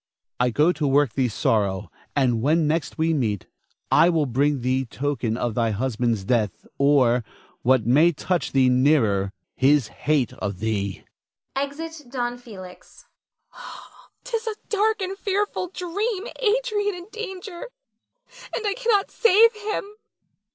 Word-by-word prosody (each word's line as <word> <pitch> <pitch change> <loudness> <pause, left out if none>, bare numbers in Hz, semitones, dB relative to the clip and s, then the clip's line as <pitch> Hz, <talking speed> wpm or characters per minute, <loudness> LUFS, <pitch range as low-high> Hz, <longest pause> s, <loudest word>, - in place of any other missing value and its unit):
I 125 0 +3
go 150 +8 +3
to 150 -4 -1
work 140 -3 +3
thee 130 -2 +1
sorrow; 105 -3 0 0.2
and 125 -5 +2
when 155 +5 +2
next 160 +2 -1
we 160 +1 +2
meet 110 - -1 0.5
I 170 - +6
will 160 -4 +2
bring 140 +2 +1
thee 130 +2 +1
token 130 -3 -2
of 120 -2 -1
thy 115 0 +1
husband's 115 -1 -1
death 105 -5 0
or, 130 -4 +4 0.4
what 130 -3 +3
may 150 +8 +5
touch 175 +3 -2
thee 135 -1 +4
nearer, 125 -7 +3 0.2
his 135 -3 +3
hate 145 -5 0
of 100 -3 -4
thee. 100 -2 -2 0.5
[Exit 295 +2 -4
Don 245 -1 -3
Felix. 190 -7 -12 0.5
Nina. - - -12 0.6
'Tis 460 -2 -3
a 440 - -2
dark 430 -1 +1
and 380 +1 -3
fearful 400 -1 -1
dream, 380 +4 -3
Adrian 430 -3 +1
in 350 -1 -9
danger, 400 -1 -7 0.9
and 445 - -3
I 405 - +1
cannot 445 -3 +1
save 460 +1 +5
him. 425 0 -3
150 Hz, 140 wpm, -24 LUFS, -, 0.9 s, I